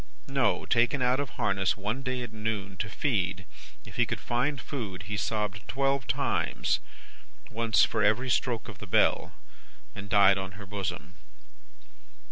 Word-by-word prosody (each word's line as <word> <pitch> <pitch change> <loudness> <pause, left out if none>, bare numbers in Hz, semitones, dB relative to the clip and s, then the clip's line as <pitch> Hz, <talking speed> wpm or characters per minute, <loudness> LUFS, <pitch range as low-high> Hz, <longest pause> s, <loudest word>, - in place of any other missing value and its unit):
No! 135 -1 +1
Taken 125 +3 +2
out 125 +2 +3
of 145 -3 -2
harness 95 -1 +1
one 105 +6 -2
day 130 -2 -2
at 115 -2 -8
noon, 105 -3 -3
to 105 +1 -3
feed 95 -6 -1 0.4
if - - -11
he - - +3
could - - -3
find 130 +4 0
food 105 - -5
he 105 +5 -4
sobbed 105 -1 -2
twelve 135 +1 0
times, - - 0 0.7
once 110 -4 +4
for 110 - -1
every 120 +5 +3
stroke 120 -2 0
of 105 -6 -9
the 105 - -8
bell, - - +2 0.6
and 100 0 -8
died 100 -1 +6
on 95 0 -5
her 100 +1 -9
bosom. 95 -4 -4
105 Hz, 155 wpm, -29 LUFS, 100-125 Hz, 0.7 s, died